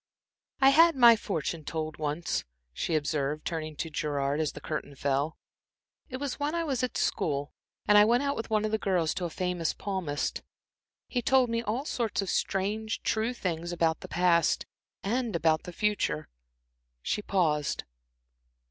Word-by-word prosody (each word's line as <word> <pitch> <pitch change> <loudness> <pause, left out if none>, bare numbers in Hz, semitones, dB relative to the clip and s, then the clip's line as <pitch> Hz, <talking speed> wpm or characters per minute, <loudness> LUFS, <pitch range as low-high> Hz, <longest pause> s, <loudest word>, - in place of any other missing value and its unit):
"I 270 -1 +7
had 330 +3 +6
my 240 -3 +8
fortune 165 -6 -3
told 155 +1 -4
once," 150 +2 -1 0.3
she 160 - -1
observed, 150 0 -1
turning 155 -2 -3
to 165 +2 -4
Gerard, 145 -1 -1
as 155 -2 0
the - - -8
curtain 150 -2 -5
fell. 140 +3 -1 0.7
"It 255 - -4
was 280 0 -4
when 295 +3 -1
I 335 - 0
was 270 -6 -1
at 255 - -2
school, 145 -1 -1 0.3
and 210 0 +7
I 210 - +7
went 250 +5 +2
with 225 - -5
one 215 -1 +2
of 215 - -1
the 220 - +1
girls 180 -6 +1
to 185 - -3
a - - -2
famous 180 -1 -1
palmist. 185 -8 -2 0.7
He 245 - -1
told 260 -1 +3
me 230 0 0
all 235 +5 -2
sorts 225 -8 -1
of 190 - -2
strange, 215 +3 -1
true 220 +2 +1
things 175 -5 -3
about 165 -2 +1
the - - -9
past, 170 -2 +2 0.4
and 230 0 -1
about 160 -1 +2
the 180 - -6
future." 210 -5 0 0.8
She - - -1
paused. 160 -8 0
180 Hz, 165 wpm, -29 LUFS, 155-230 Hz, 0.8 s, my